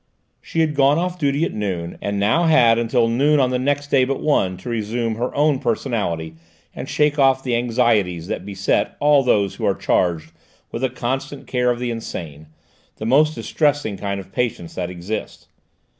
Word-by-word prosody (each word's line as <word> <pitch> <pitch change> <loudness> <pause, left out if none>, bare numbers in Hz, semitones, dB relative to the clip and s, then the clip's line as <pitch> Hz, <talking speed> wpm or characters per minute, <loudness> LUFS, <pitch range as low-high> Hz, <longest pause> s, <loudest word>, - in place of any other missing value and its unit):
She 165 - -2
had 155 -2 +1
gone 140 +1 +3
off 180 +1 -2
duty 145 +1 +1
at - - -4
noon, 90 -5 -4
and 100 0 -2
now 110 +12 +2
had 120 -8 +5
until 120 0 +1
noon 140 +6 +3
on 130 -2 +2
the 125 - 0
next 145 +2 -1
day 135 -2 +4
but 135 +1 -1
one 95 -11 +1
to 95 - -12
resume 115 0 -2
her 120 +3 -3
own 145 -2 +2
personality 105 - -2 0.4
and 130 - -6
shake 150 0 +1
off 135 -1 +4
the 125 -2 0
anxieties 115 -8 +1
that 90 - -4
beset 100 0 -1
all 145 -1 +5
those 105 -7 +1
who - - -4
are - - +2
charged 80 -3 0 0.4
with 115 - -5
the 130 - +1
constant 130 +3 -4
care 125 -1 0
of 120 - 0
the 120 0 -3
insane, 80 -9 -7 0.5
the 110 - -6
most 150 +6 +3
distressing 145 -8 0
kind 100 +1 -3
of 95 0 -11
patients 110 -7 -3
that 90 -1 -3
exists. 90 +4 -6
120 Hz, 190 wpm, -21 LUFS, 100-140 Hz, 0.5 s, had